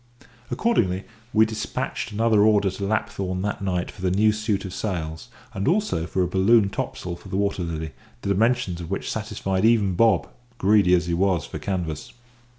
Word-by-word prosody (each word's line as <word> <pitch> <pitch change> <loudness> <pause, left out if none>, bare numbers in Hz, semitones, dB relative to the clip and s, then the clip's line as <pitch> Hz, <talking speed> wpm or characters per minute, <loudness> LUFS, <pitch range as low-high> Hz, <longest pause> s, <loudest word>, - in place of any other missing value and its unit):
Accordingly, 95 - +1 0.3
we 110 0 +5
despatched 110 -2 -4
an 105 +2 -3
order 105 -3 +4
to 100 - -6
Lapthorn 95 -3 -1
that 105 -1 -2
night 90 -2 -1
for 95 - -14
the 95 - +1
new 105 +4 +4
suit 105 -2 -1
of 95 - -6
sails, 85 -2 -4 0.3
and 100 -2 -2
also 170 - +1
for 90 +2 0
a - - 0
balloon 100 +3 +4
topsail 90 -2 -4
for - - -13
the 95 - -2
Water 100 -2 0
Lily, 80 -2 -4 0.3
the 100 - -2
dimensions 110 -3 +1
of 85 - -7
which 95 - -3
satisfied 100 -3 -2
even 110 -4 +4
Bob, 105 0 +3 0.3
greedy 100 -3 +4
as 90 0 0
he 85 - -1
was 90 -3 +1
for - - -7
canvas. 85 -6 -4
95 Hz, 180 wpm, -24 LUFS, 90-110 Hz, 0.3 s, we